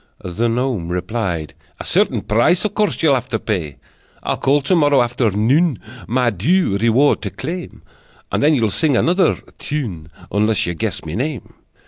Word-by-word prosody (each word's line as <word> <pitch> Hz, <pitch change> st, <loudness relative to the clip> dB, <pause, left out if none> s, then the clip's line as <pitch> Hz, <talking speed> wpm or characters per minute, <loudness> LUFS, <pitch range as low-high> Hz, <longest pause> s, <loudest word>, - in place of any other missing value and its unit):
The 105 Hz, +7 st, -1 dB
gnome 120 Hz, -7 st, -1 dB
replied: 90 Hz, -3 st, -3 dB, 0.3 s
"A -, -, -7 dB
certain -, -, +2 dB
price 120 Hz, -, +2 dB
Of 210 Hz, -, -1 dB
course 210 Hz, -6 st, 0 dB
you'll 150 Hz, -3 st, +5 dB
have 130 Hz, -1 st, -1 dB
to 115 Hz, -, 0 dB
pay. 90 Hz, -11 st, -3 dB, 0.5 s
I'll -, -, 0 dB
call 145 Hz, +2 st, +2 dB
to 140 Hz, +7 st, +2 dB
morrow 145 Hz, -4 st, +4 dB
afternoon, 120 Hz, -, +2 dB, 0.3 s
My 125 Hz, 0 st, +1 dB
due 120 Hz, -, +1 dB
reward 115 Hz, +6 st, +3 dB
to -, -, -3 dB
claim, 175 Hz, +1 st, -7 dB, 0.5 s
And -, -, 0 dB
then 150 Hz, +1 st, +4 dB
you'll 110 Hz, -5 st, +1 dB
sing 145 Hz, +3 st, +2 dB
another 180 Hz, +3 st, +3 dB, 0.2 s
tune 105 Hz, -, -4 dB, 0.2 s
Unless 105 Hz, 0 st, +2 dB
you 85 Hz, -, -2 dB
guess 80 Hz, -, -3 dB
my 80 Hz, -, -5 dB
name!" 130 Hz, -, -4 dB
120 Hz, 165 wpm, -19 LUFS, 105-145 Hz, 0.5 s, you'll